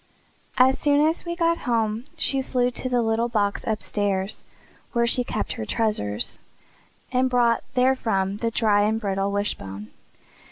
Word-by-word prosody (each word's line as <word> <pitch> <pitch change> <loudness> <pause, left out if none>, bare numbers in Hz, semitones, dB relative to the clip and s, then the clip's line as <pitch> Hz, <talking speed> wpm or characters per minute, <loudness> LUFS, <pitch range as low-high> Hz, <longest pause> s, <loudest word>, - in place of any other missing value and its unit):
As 260 +1 +5
soon 290 -1 +3
as 325 +3 -2
we 340 0 -3
got 335 -1 +1
home 225 0 0
she 270 -1 +1
flew 250 -1 0
to 255 +1 -4
the 245 -1 +2
little 225 +1 +1
box 205 -3 0
upstairs 205 -2 -1 0.5
where 235 -1 +2
she 245 +1 +2
kept 215 -3 -3
her 110 - -5
treasures, 155 - -1 0.7
and 255 0 +2
brought 240 -2 +2
therefrom 225 -7 +1
the 230 +2 -1
dry 215 -3 +2
and 215 +2 +1
brittle 195 -2 -1
wishbone. 105 - -3
225 Hz, 150 wpm, -24 LUFS, 205-250 Hz, 0.7 s, As